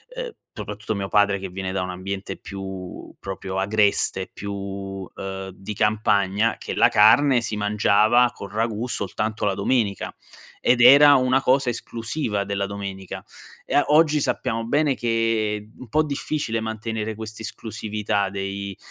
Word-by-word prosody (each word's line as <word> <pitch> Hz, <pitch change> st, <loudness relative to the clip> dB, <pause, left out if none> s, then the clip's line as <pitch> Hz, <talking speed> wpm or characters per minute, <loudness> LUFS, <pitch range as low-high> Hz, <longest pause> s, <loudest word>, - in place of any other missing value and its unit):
ehm, -, -, -4 dB, 0.2 s
soprattutto 105 Hz, +1 st, -5 dB
mio 100 Hz, -1 st, -3 dB
padre, 100 Hz, -1 st, +3 dB
che 95 Hz, -, -5 dB
viene 95 Hz, +1 st, -4 dB
da 95 Hz, 0 st, -1 dB
un 90 Hz, -, -3 dB
ambiente 95 Hz, +2 st, -5 dB
più 95 Hz, -2 st, -8 dB
proprio 95 Hz, -1 st, -5 dB
agreste, 100 Hz, -1 st, +1 dB
più, 100 Hz, -1 st, -6 dB
ehm, 95 Hz, 0 st, -5 dB
di 95 Hz, +3 st, -7 dB
campagna, 105 Hz, 0 st, +1 dB
che -, -, -5 dB
la -, -, +5 dB
carne 125 Hz, +5 st, +6 dB
si 110 Hz, -, -3 dB
mangiava 105 Hz, +3 st, +3 dB
col 100 Hz, -, -8 dB
ragù 110 Hz, +1 st, -1 dB
soltanto 110 Hz, 0 st, -2 dB
la 100 Hz, -, +2 dB
domenica, 100 Hz, -1 st, 0 dB, 0.5 s
ed 120 Hz, -1 st, +3 dB
era 140 Hz, +3 st, +9 dB
una 130 Hz, 0 st, +3 dB
cosa 130 Hz, 0 st, +3 dB
esclusiva 115 Hz, -2 st, -3 dB
della 100 Hz, 0 st, -2 dB
domenica. 100 Hz, -1 st, -6 dB, 0.4 s
E -, -, -5 dB
a 145 Hz, -, +5 dB
oggi 150 Hz, 0 st, +4 dB
sappiamo 115 Hz, -4 st, -1 dB
bene 145 Hz, +3 st, +2 dB
che 115 Hz, -3 st, 0 dB
u -, -, -15 dB
un -, -, -12 dB
po' 155 Hz, +7 st, +3 dB
difficile 140 Hz, -5 st, -2 dB
mantenere 110 Hz, 0 st, -4 dB
quest'esclusività 110 Hz, -1 st, -3 dB
dei 100 Hz, 0 st, -5 dB
105 Hz, 145 wpm, -23 LUFS, 100-115 Hz, 0.5 s, era